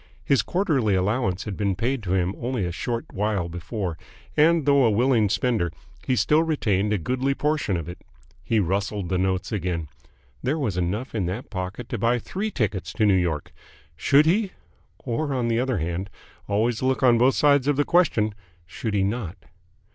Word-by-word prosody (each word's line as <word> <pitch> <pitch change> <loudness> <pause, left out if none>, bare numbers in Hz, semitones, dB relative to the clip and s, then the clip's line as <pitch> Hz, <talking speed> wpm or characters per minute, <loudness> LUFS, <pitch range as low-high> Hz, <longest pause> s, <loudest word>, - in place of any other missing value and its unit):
His 140 - +3
quarterly 140 - +1
allowance 95 0 0
had 105 -3 -5
been 100 -2 0
paid 125 +6 -1
to 95 -3 -2
him 90 0 +1
only 120 -5 -2
a 85 - -2
short 115 +7 -3
while 100 -3 -1
before, 90 0 -4 0.4
and, 160 0 +4
though 140 -1 +5
a 115 - +5
willing 115 -1 +3
spender, 110 -5 0 0.4
he 130 - +2
still 125 +8 +3
retained 105 - 0
a 105 - +2
goodly 130 - -1
portion 150 - 0
of 85 - -5
it. 85 - -8 0.4
He 115 - +1
rustled 100 +1 -1
the 95 -1 0
notes 95 0 -1
again. 90 -6 -2 0.5
There 140 +5 0
was 120 - -1
enough 95 +8 -2
in 100 -6 -1
that 100 +8 -5
pocket 95 +4 -5
to 120 - -3
buy 115 +3 +2
three 195 - -3
tickets 105 - -2
to 110 - +1
New 100 - +5
York. 85 -5 -1 0.4
Should 140 - +4
he?... 190 +4 +1 0.4
Or, 135 +3 -2
on 120 -2 0
the 115 0 +1
other 130 -2 0
hand 85 +4 -3 0.4
always 110 +3 0
look 130 -2 0
on 120 -2 +5
both 130 +2 +4
sides 145 -2 +4
of 145 - +3
the 145 +1 +1
question 120 - +2 0.3
should 110 +4 -4
he 100 - +2
not? 100 -3 -2
110 Hz, 185 wpm, -24 LUFS, 95-130 Hz, 0.5 s, though